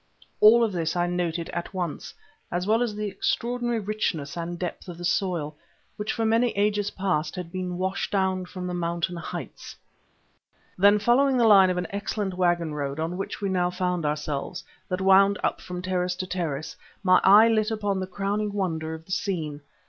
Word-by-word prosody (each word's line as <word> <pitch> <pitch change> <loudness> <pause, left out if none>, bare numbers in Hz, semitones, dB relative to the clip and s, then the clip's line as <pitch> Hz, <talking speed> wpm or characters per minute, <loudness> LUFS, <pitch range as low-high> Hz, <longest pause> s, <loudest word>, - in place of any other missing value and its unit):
All 230 +3 +7
of 225 - +1
this 165 -3 -2
I 175 0 +2
noted 175 -1 -2
at 170 +3 -5
once, 175 -4 -4 0.4
as 180 +1 -1
well 220 +3 +2
as 235 -4 -1
the 210 0 -3
extraordinary 240 +4 -1
richness 195 -9 -2
and 170 0 -4
depth 175 +1 -5
of 175 -2 -8
the 175 - -6
soil, 170 -5 -1 0.4
which 210 0 -3
for 225 - -1
many 230 +2 +3
ages 205 0 +1
past 180 -6 -1
had 180 -2 -6
been 180 -1 -4
washed 190 +1 -2
down 190 -2 0
from 180 0 -7
the 180 - -3
mountain 170 +1 -2
heights. 170 - -7 1.0
Then 200 +2 +5
following 255 +5 +3
the 235 - +4
line 195 -4 +7
of 180 - -1
an 180 - -1
excellent 200 -1 -3
waggon 175 -3 +1
road, 140 0 -3
on 165 +2 -2
which 195 +3 -5
we 200 - -1
now 180 -1 +1
found 180 -1 -1
ourselves, 150 +3 -3 0.3
that 180 0 -2
wound 195 +1 +5
up - - 0
from 180 0 -6
terrace 180 -1 -1
to 185 - -4
terrace, 165 -5 -3 0.3
my 185 -1 +5
eye 210 +4 +8
lit 215 -1 +2
upon 205 -3 -1
the 185 - -3
crowning 205 +2 -2
wonder 160 -5 -2
of 160 0 -12
the 190 - -12
scene. 160 -7 -2
185 Hz, 190 wpm, -26 LUFS, 175-205 Hz, 1.0 s, eye